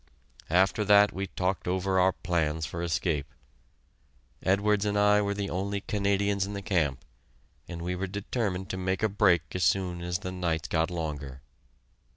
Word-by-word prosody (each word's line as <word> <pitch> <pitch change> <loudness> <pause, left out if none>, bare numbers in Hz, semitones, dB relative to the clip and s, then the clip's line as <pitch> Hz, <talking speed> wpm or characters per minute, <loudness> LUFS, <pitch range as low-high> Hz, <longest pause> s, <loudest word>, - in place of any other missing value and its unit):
After 95 +5 +3
that 105 0 +6
we 95 +1 -3
talked 95 0 -2
over 95 +1 +1
our 95 +1 +4
plans 80 -3 -1
for 85 +3 -5
escape. 80 -3 -1 1.1
Edwards 100 +2 +2
and 105 -1 0
I 105 0 +5
were 100 0 -1
the 100 -1 -3
only 100 +3 -2
Canadians 100 -1 0
in 100 +1 -4
the 100 - -4
camp, 85 -9 0 0.6
and 85 -1 -6
we 90 +1 -2
were 95 +2 -3
determined 100 -1 -3
to 95 - -4
make 95 +2 -1
a - - +5
break 95 -5 +3
as 90 - -1
soon 90 -3 +1
as 90 0 -2
the 90 -1 -6
nights 85 -4 -2
got 80 +1 +1
longer. 75 -6 -5
95 Hz, 170 wpm, -28 LUFS, 85-100 Hz, 1.1 s, that